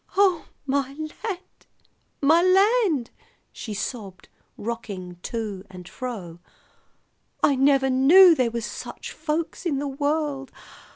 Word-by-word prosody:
"Oh, 380 -5 +3 0.2
my 275 -1 -1
land! 355 +5 -7 0.6
my 320 +4 +5
land!" 375 - +3 0.4
she 215 -3 -7
sobbed, 200 -3 -6 0.3
rocking 200 -6 -6
to 210 -4 -4
and 180 -2 -11
fro. 190 -11 -7 1.0
"I 285 - +5
never 270 0 +3
knew 335 +8 +8
there 255 -6 +1
was 230 -1 -4
such - - -7
folks 315 +3 -3
in 320 -6 0
the 285 +1 -2
world. 285 0 -2
275 Hz, 115 wpm, -24 LUFS, 230-320 Hz, 1.0 s, knew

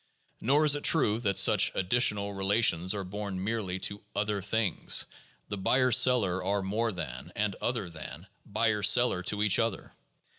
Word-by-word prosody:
Nor 145 +6 +2
is 150 - +5
it 145 - -3
true 110 -9 +2
that 100 -5 -1
such - - +4
additional 100 0 +1
relations 95 -2 +1
are 100 - -4
borne 100 0 -6
merely 100 -3 -3
to 100 0 -3
other 105 -1 -2
things; 105 +2 0 0.4
the 100 - -4
buyer 130 +6 +1
seller 115 -7 +3
are 100 +1 -1
more 110 +4 -1
than, 70 -9 -7
and 105 -2 -2
other 120 -6 -2
than, 80 -2 -9 0.2
buyer 105 0 -1
seller 100 -1 +3
to 105 +3 -1
each 105 -3 +3
other. 115 -4 -3
105 Hz, 160 wpm, -28 LUFS, 95-115 Hz, 0.4 s, is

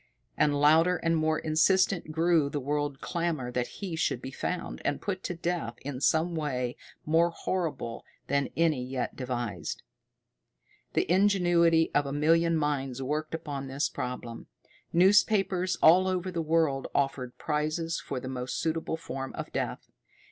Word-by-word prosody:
And 145 -1 +2
louder 160 +5 +5
and 165 0 +1
more 155 0 +1
insistent 165 +2 +2
grew 165 -2 +2
the 145 - -2
world 145 0 -2
clamor 165 -8 -2
that 125 0 -1
he 190 -5 -6
should 160 - 0
be 130 - -7
found, 180 +6 -4
and 145 - -1
put 190 -2 -3
to 180 - -3
death 170 -8 -2
in 135 -1 -5
some 160 +4 +2
way 130 -6 -2 0.3
more 165 +2 +3
horrible 165 -9 -3 0.2
than 140 -1 0
any 160 -6 +2
yet 130 0 -3
devised. 120 -4 -4 1.1
The - - +2
ingenuity 175 -3 +3
of 145 -1 +2
a 140 - -3
million 165 +3 +3
minds 135 -4 -1
worked 155 +4 -2
upon 140 -4 -5
this 135 +2 -1
problem. 125 -2 -6 0.4
Newspapers 190 0 +3
all 180 +4 +7
over 185 0 -1
the 170 -2 -2
world 155 -4 +1
offered 135 -3 -1
prizes 155 +2 -1
for 135 - -4
the 130 - -7
most 130 -1 -4
suitable 160 0 -1
form 135 -4 -6
of - - -6
death. - - -3
155 Hz, 150 wpm, -29 LUFS, 135-170 Hz, 1.1 s, all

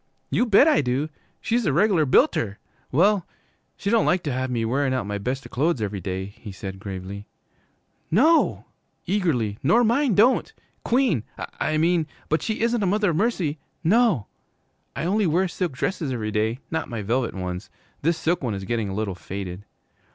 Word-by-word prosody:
'You 245 - +2
bet 220 +7 +6
I 310 - +4
do! 135 +4 -1 0.3
She's 235 -2 0
a - - +3
reg'lar 175 -2 +3
builter! 105 -4 +3 0.3
Well, 185 +6 +3 0.5
she 200 - -2
don't 230 -1 +3
like 180 0 +2
to 145 - -2
have 130 +1 -2
me 115 -2 -1
wearin' 130 +3 +1
out 125 -5 -1
my 100 0 -3
best 125 +4 -3
clo'es 150 +2 +1
every 105 -2 -3
day,' 95 +1 -3
he 105 - -8
said 95 0 -7
gravely. 100 0 -7 0.8
'No,' 310 - +3 0.4
eagerly, 135 - 0
'nor 200 - +4
mine 240 0 +2
don't. 235 +6 +3 0.3
Queen, 240 - +2 0.4
I 155 - 0
mean, 165 0 +2 0.2
but 155 - +1
she 220 -1 -2
isn't 235 0 +1
a 195 - +1
mother, 205 -1 +2
mercy, 170 -5 0 0.2
no! 195 - +3 0.7
I - - -2
only 200 +2 +2
wear 180 +4 +2
silk 175 -3 -3
dresses 150 +2 -2
every 110 -4 -2
day, 110 +3 0
not 160 - -2
my 115 -3 -4
velvet 120 +3 0
ones. 90 +1 -5 0.3
This 165 +2 +1
silk 175 +2 0
one 120 -6 -2
is 95 - -5
getting 115 -1 -1
a 95 - -4
little 105 -2 -2
faded.' 95 +1 -7
145 Hz, 175 wpm, -24 LUFS, -, 0.8 s, bet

